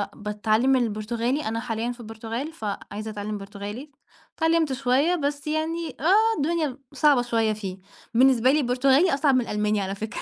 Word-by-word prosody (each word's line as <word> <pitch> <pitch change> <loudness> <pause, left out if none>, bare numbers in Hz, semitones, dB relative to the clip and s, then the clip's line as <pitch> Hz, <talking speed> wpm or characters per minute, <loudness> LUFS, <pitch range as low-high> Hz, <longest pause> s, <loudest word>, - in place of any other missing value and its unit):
باتعلّم 215 +5 +1
البرتغالي، 235 +4 -1
أنا 225 +1 -2
حاليًا 230 0 -3
في 245 - -10
البرتغال 225 +5 -5
ف 220 - -8 0.3
عايزة 215 +1 -5
أتعلّم 210 0 -4
برتغالي، 205 +7 -8 0.5
اتعلّمت 320 -3 +2
شوية 270 +6 +2
بس 290 -2 -3
يعني 315 0 -2
آه، 425 +8 +3
الدنيا 305 -3 -1 0.2
صعبة 290 -5 +4
شوية 225 -2 +1
فيه، 195 -3 -6 0.4
بالنسبة 255 0 +5
لي 300 - +3
البرتغالي 270 +6 +3
أصعب 280 -1 +3
من 255 - +3
الألماني 210 -2 0
على 195 0 -3
فكرة. 220 +3 -5
245 Hz, 160 wpm, -25 LUFS, 215-290 Hz, 0.5 s, بالنسبة